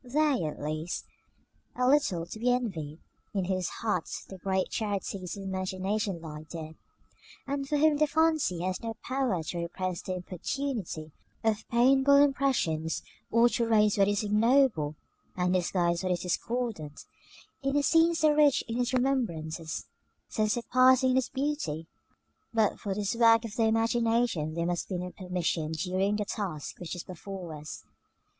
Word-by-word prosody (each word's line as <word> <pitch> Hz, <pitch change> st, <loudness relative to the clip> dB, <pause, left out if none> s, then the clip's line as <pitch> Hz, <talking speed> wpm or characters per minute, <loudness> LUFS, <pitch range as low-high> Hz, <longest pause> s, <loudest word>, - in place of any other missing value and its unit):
They, 280 Hz, -, +1 dB
at 150 Hz, -, -4 dB
least, 155 Hz, +3 st, -3 dB, 0.7 s
are 250 Hz, 0 st, +1 dB
little 255 Hz, -, +3 dB
to 215 Hz, -, -9 dB
be 245 Hz, +2 st, +2 dB
envied, 180 Hz, -12 st, -2 dB, 0.4 s
in 190 Hz, -2 st, +1 dB
whose 185 Hz, -1 st, -1 dB
hearts 220 Hz, -2 st, -3 dB
the 190 Hz, -, -10 dB
great 190 Hz, +1 st, -1 dB
charities 200 Hz, -3 st, -3 dB
of 200 Hz, -, -7 dB
the -, -, -5 dB
imagination 190 Hz, +1 st, -2 dB
lie 155 Hz, -2 st, -8 dB
dead, 160 Hz, -2 st, -7 dB, 0.7 s
and 275 Hz, 0 st, -3 dB
for 295 Hz, -, +2 dB
whom 305 Hz, 0 st, +4 dB
the 305 Hz, +1 st, +3 dB
fancy 315 Hz, -, +2 dB
has 185 Hz, 0 st, -2 dB
no 225 Hz, -1 st, -4 dB
power 255 Hz, -10 st, 0 dB
to 175 Hz, -, -5 dB
repress 180 Hz, +1 st, -3 dB
the 185 Hz, -, -4 dB
importunity 180 Hz, -, -4 dB, 0.3 s
of 220 Hz, -1 st, 0 dB
painful 265 Hz, +4 st, +5 dB
impressions, 265 Hz, -, +2 dB, 0.3 s
or 230 Hz, +1 st, +5 dB
to 235 Hz, -1 st, 0 dB
raise 210 Hz, -2 st, +3 dB
what 195 Hz, -, +5 dB
is 205 Hz, +1 st, +1 dB
ignoble, 210 Hz, -, +3 dB, 0.4 s
and 180 Hz, 0 st, +1 dB
disguise 175 Hz, -1 st, +1 dB
what 185 Hz, -1 st, -1 dB
is 175 Hz, -, -3 dB
discordant, 185 Hz, -5 st, -3 dB, 0.6 s
in 275 Hz, 0 st, -1 dB
a 290 Hz, -, +2 dB
scene 330 Hz, +2 st, +4 dB
so 310 Hz, -2 st, +4 dB
rich 295 Hz, -2 st, +4 dB
in 230 Hz, +1 st, -2 dB
its 250 Hz, +1 st, 0 dB
remembrances, 170 Hz, -12 st, -1 dB, 0.4 s
so 215 Hz, -2 st, 0 dB
surpassing 255 Hz, +3 st, +4 dB
in 255 Hz, -, +3 dB
its 260 Hz, -, +1 dB
beauty. 265 Hz, -, -2 dB, 0.7 s
But 220 Hz, -2 st, +1 dB
for 195 Hz, -2 st, -3 dB
this 205 Hz, +1 st, -1 dB
work 230 Hz, 0 st, +5 dB
of 220 Hz, -1 st, -7 dB
the 225 Hz, -, +2 dB
imagination 225 Hz, -7 st, +1 dB
there 170 Hz, 0 st, -1 dB
must 175 Hz, 0 st, -2 dB
be 185 Hz, -, -2 dB
no 180 Hz, +1 st, -5 dB
permission 175 Hz, -4 st, -2 dB
during 185 Hz, +5 st, 0 dB
the 210 Hz, 0 st, -1 dB
task 185 Hz, -8 st, -4 dB
which 175 Hz, 0 st, -5 dB
is 175 Hz, -, -6 dB
before 185 Hz, -1 st, -7 dB
us. 150 Hz, 0 st, -8 dB
205 Hz, 165 wpm, -29 LUFS, 175-250 Hz, 0.7 s, painful